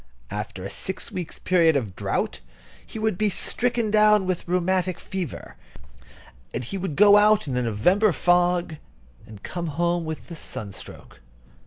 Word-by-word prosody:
After 105 -2 -5
a 95 - -5
six 190 - -3
weeks' 175 -3 -5
period 170 -4 +3
of 110 -9 -2
drought, - - -2 0.4
he - - -10
would 215 -4 -1
be 215 -1 +2
stricken 235 +2 0
down 210 -2 +5
with 185 -2 -3
rheumatic 180 0 0
fever; 190 -4 -6 1.0
and 125 - -2
he 125 - -6
would 190 -6 -3
go 205 +2 +7
out 210 -2 +4
in 130 - -2
a 125 - +1
November 180 - +2
fog 175 0 +1 0.5
and 105 -2 -13
come 175 -1 -4
home 170 +3 0
with 160 +2 -7
a - - -5
sunstroke. 100 - -7
175 Hz, 155 wpm, -24 LUFS, 150-200 Hz, 1.0 s, go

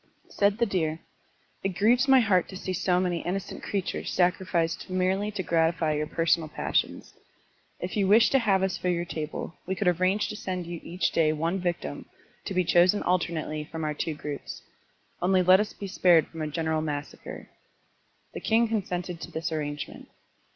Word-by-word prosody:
Said 200 0 +2
the 235 - +3
deer, 165 -6 -1 0.6
"It 190 -1 -2
grieves 240 +6 +4
my 265 -1 +7
heart 190 -6 +2
to 190 - -7
see 185 0 -4
so 180 0 +1
many 180 -2 0
innocent 190 +2 -4
creatures 195 -2 -3
sacrificed 175 -2 0
merely 185 +3 0
to 200 -2 -4
gratify 165 -1 +1
your 150 0 -1
selfish 165 +1 +2 0.2
passions. - - -1 0.7
If 180 - -4
you 200 -3 +2
wish 220 +4 +6
to 270 - +5
have 195 -5 +2
us 190 -1 -1
for 180 - -1
your 175 -1 0
table, 155 0 -5
we 190 - -1
could 195 - -1
arrange 185 +4 +2
to - - -5
send 185 -4 -4
you 170 0 -6
each 180 +2 -1
day 155 -2 +3
one 165 +5 -1
victim, 170 - -3 0.4
to - - -3
be 185 - +3
chosen 175 +4 +4
alternately 165 -4 -1
from 160 -1 -4
our 150 0 -1
two 155 +1 -3
groups. 145 -1 -7 0.6
Only 185 +1 +3
let 185 +1 +7
us 210 0 -1
be 200 - -8
spared 180 -4 +4
from 165 - -8
a 155 - -1
general 160 +1 -1
massacre.*' 150 -1 -6 0.8
The - - -5
king 230 +1 +2
consented 180 -5 -3
to - - -7
this 165 +1 -3
arrangement. 145 -2 -5
180 Hz, 180 wpm, -27 LUFS, 165-195 Hz, 0.8 s, my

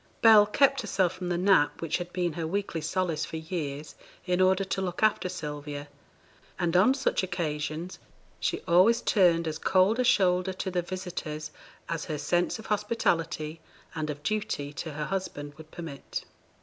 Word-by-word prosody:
Bell 215 -2 +8
kept 275 +4 +3
herself 190 -5 +1
from 180 -1 -5
the 175 - 0
nap 185 -5 +3
which 165 - -1
had 175 0 -6
been 175 -2 -1
her 165 0 -3
weekly 195 -2 -2
solace 165 0 -1
for 160 - -5
years, 155 -3 -5 0.3
in 180 0 +1
order 190 +1 +4
to 195 0 -2
look 180 +1 -3
after 210 -4 +3
Sylvia, 145 -4 -6 0.7
and 175 -1 0
on 210 +9 +5
such 275 - +1
occasions 165 -1 -3 0.4
she - - -1
always 185 +7 +5
turned 170 -5 +3
as 155 0 -3
cold 190 +7 +3
a - - +4
shoulder 185 -4 +3
to 190 0 -4
the 180 -1 0
visitors 175 -4 -5 0.4
as 165 -2 -3
her 155 - -3
sense 175 +4 0
of 220 - -11
hospitality 165 -7 -1 0.3
and 155 -1 -3
of 145 0 -5
duty 150 -9 -2
to 155 +2 -5
her 150 +1 -3
husband 145 -6 -4
would 155 +1 -13
permit. 160 -5 -7
175 Hz, 170 wpm, -28 LUFS, 155-190 Hz, 0.7 s, Bell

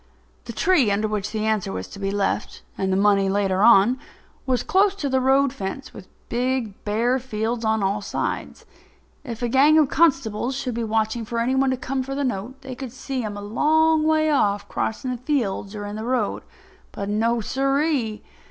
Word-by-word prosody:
The - - -6
tree 295 - +3
under 205 +2 +1
which 210 -1 -2
the 215 -1 -2
answer 215 - 0
was 95 0 -5
to - - -10
be 195 -1 -2
left—and 195 -1 -2
the 190 - +2
money 200 -1 +3
later 195 -1 +1
on—was 245 +3 +2
close 390 +1 +3
to 305 -8 -3
the 260 0 +1
road 270 +1 +3
fence 205 +3 -6
with 185 - -11 0.2
big, 245 -3 -2
bare 235 +5 +1
fields 230 -1 -3
on 220 -1 +1
all 200 +2 0
sides. 200 - -4 0.6
If 235 0 -6
a - - +2
gang 275 +6 +5
of 300 -4 +4
constables 265 -6 +1
should 255 -2 -3
be 235 +1 -2
watching 220 +1 -1
for 230 +2 -5
any 235 +3 +1
one 265 0 +2
to 260 - 0
come 260 +1 -2
for 270 +1 -5
the 285 - -1
note 250 +2 -4
they 260 -1 -6
could 255 -1 -7
see 260 +1 -4
him 210 -2 -5
a - - -6
long 315 +8 +3
way 310 0 +2
off 205 -8 +1
crossing 255 +4 -3
the 250 - -3
fields 230 -7 -2
or 205 -1 -5
in 205 +1 -6
the 220 - -5
road. 240 -3 -1 0.5
But 200 - -5
no, 225 +3 +1
sirree! 270 -2 0
235 Hz, 195 wpm, -23 LUFS, 210-270 Hz, 0.6 s, gang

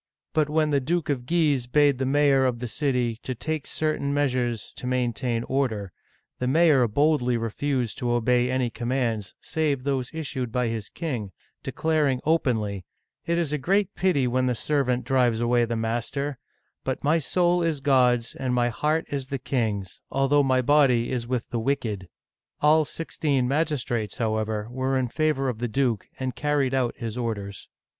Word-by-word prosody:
But 155 -2 +2
when 155 0 +1
the 140 - +3
Duke 165 +4 -1
of 125 -3 -3
Guise 150 -7 +2
bade 145 0 +3
the 130 - 0
mayor 140 -1 +4
of 125 -2 +1
the 125 +1 -4
city 125 -3 -1
take 140 +4 -4
certain 155 -2 -1
measures 125 -5 -1
to 125 - -5
maintain 120 -2 -1
order, 115 -9 -1 0.5
the 125 - -1
mayor 145 -3 +4
boldly 125 0 +2
refused 120 +2 -2
to 125 -3 -1
obey 125 +1 +2
any 130 -2 0
commands 120 -4 -2
save 150 -5 -1
those 135 -3 -1
issued 135 -6 -4
by 125 0 0
his 110 -2 -4
king, 125 - -4 0.3
declar 155 -2 0
ing 130 -2 0
openly: 110 - 0 0.2
" - - -56
It 170 0 +1
is 165 -4 -1
a 150 - 0
great 195 +6 +1
pity 180 -8 +1
when 130 +1 +1
the 125 - +1
servant 125 -1 0
drives 125 -4 +2
away 120 0 +2
the 115 0 -2
master; 120 +5 -2 0.4
but 130 - -3
my 155 +3 +3
soul 175 +3 +2
is 165 -4 0
God*s 125 -4 +3
and 130 -2 -2
my 120 0 +2
heart 155 +6 0
is 135 -2 -3
the 135 - -3
king's, 110 -7 -2
although 135 +2 +3
my 130 -2 +2
body 130 -4 +3
is 120 -2 -2
with 125 -1 -2
the 120 - -1
wicked! 110 -7 -2 0.2
*' - - -64
All 155 +1 +5
sixteen 145 -5 -1
magistrates, 135 -7 -1
however, 110 -2 -1
were 130 +1 0
in 125 -2 0
favor 155 -1 0
of 120 -4 -2
the 120 - -1
duke, 120 -3 0
and 130 -1 -3
carried 145 -3 0
out 130 -3 0
his 115 +1 -5
orders. 100 -4 -4
130 Hz, 175 wpm, -25 LUFS, 120-145 Hz, 0.5 s, All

